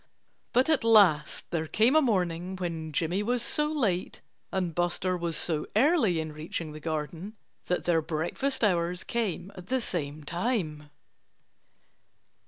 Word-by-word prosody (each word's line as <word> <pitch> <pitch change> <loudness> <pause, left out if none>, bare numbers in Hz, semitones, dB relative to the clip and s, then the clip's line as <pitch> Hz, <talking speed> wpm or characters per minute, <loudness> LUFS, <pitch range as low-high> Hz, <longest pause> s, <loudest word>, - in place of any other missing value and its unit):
But 255 +2 +3
at 315 -6 +2
last 200 -10 +4
there 160 -2 -1
came 225 - +3
a 315 - +7
morning 185 - 0
when 165 -3 -4
Jimmy 170 +6 0
was 240 +2 0
so 300 0 +1
late 210 - -1 0.3
and 180 -3 -1
Buster 175 +2 0
was 170 -2 -2
so 155 -3 -1
early 230 - +3
in 160 -1 -3
reaching 155 +1 -5
the 155 - -8
garden 160 +6 -4 0.3
that 180 - 0
their 165 -2 +2
breakfast 170 - -2
hours 175 -3 +1
came 205 -5 -2
at 180 -2 -11
the 260 +3 +1
same 155 - -3
time. 170 - -2
175 Hz, 145 wpm, -28 LUFS, 160-220 Hz, 0.3 s, a